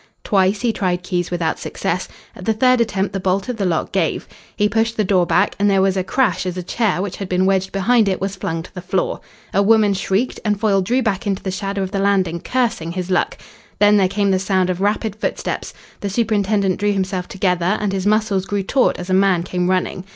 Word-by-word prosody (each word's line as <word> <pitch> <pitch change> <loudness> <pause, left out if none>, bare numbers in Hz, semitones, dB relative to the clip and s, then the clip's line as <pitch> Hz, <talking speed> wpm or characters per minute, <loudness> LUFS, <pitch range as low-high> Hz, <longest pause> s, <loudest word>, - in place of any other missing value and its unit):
Twice 195 0 +2
he 240 -2 +1
tried 180 -3 -1
keys 180 -1 -2
without 170 -2 -1
success. - - -3 0.3
At - - -10
the 225 - +2
third 255 +2 +4
attempt 195 -4 -1
the 195 - -2
bolt 190 +1 0
of 245 - -3
the 195 -3 0
lock 165 -3 -1
gave. 185 -5 -1 0.3
He 210 0 +2
pushed 225 +2 0
the 215 - +2
door 185 -3 +2
back - - +2
and 205 0 +3
there 195 -1 +3
was 195 -1 +2
a 190 - 0
crash 205 -3 0
as 180 0 -4
a 180 - -3
chair 195 -1 0
which 200 -2 -5
had 195 -2 -6
been 185 +1 +2
wedged 190 0 +1
behind 215 +2 +3
it 190 - -1
was 195 0 -3
flung 165 -4 -3
to - - -14
the 180 - -7
floor. - - -1 0.3
A 200 - +3
woman 215 -1 +4
shrieked, 195 +5 -1
and 210 -2 0
Foyle 200 -3 +2
drew 245 +7 +1
back 210 -1 -1
into 195 -2 -2
the 190 - -2
shadow 195 +1 -3
of 190 - -4
the 200 - -1
landing, 190 -4 +1
cursing 215 -8 -1
his 185 0 -4
luck. 185 - +1 0.4
Then 210 0 +5
there 190 -2 +4
came 200 +1 0
the 190 - +2
sound 185 -1 +1
of 180 +1 -4
rapid 210 +1 0
footsteps. - - -3 0.3
The 200 - -3
superintendent 200 -3 +1
drew 205 0 +1
himself 190 -2 -2
together, 185 0 0
and 205 -2 -1
his 195 0 -1
muscles 210 -3 +1
grew 200 0 -2
taut 260 +6 +2
as 180 - -5
a - - +3
man 190 -2 +3
came 180 0 -1
running. 185 0 -1
195 Hz, 235 wpm, -19 LUFS, 185-210 Hz, 0.4 s, Then